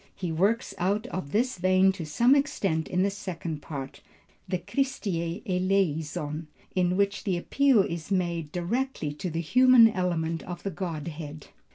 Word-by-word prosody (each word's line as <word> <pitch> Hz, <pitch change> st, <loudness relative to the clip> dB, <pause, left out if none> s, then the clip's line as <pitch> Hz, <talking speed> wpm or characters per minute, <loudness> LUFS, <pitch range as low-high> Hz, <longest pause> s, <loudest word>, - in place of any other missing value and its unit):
He 180 Hz, -3 st, -3 dB
works 200 Hz, +8 st, +1 dB
out 200 Hz, +4 st, 0 dB
of 165 Hz, -7 st, -5 dB
this 235 Hz, 0 st, 0 dB
vein 185 Hz, +1 st, +4 dB
to 180 Hz, -5 st, -6 dB
some 235 Hz, -, +4 dB
extent 200 Hz, -, 0 dB
in 180 Hz, +1 st, +1 dB
the 200 Hz, -, +1 dB
second 170 Hz, -6 st, -5 dB
part, 135 Hz, -3 st, -7 dB, 0.5 s
the 185 Hz, -, 0 dB
Christe 260 Hz, +9 st, -2 dB
eleison, 170 Hz, -4 st, -1 dB, 0.3 s
in 180 Hz, 0 st, +1 dB
which 200 Hz, +1 st, +1 dB
the 190 Hz, -4 st, 0 dB
appeal 260 Hz, +3 st, +3 dB
is 170 Hz, -1 st, -5 dB
made 170 Hz, -5 st, -1 dB
directly 180 Hz, -, -2 dB
to 175 Hz, +5 st, -4 dB
the 165 Hz, 0 st, -2 dB
human 250 Hz, +6 st, +7 dB
element 170 Hz, -5 st, -1 dB
of 175 Hz, -1 st, -7 dB
the 195 Hz, -, -2 dB
Godhead. 155 Hz, -4 st, -6 dB
180 Hz, 155 wpm, -27 LUFS, 165-200 Hz, 0.5 s, human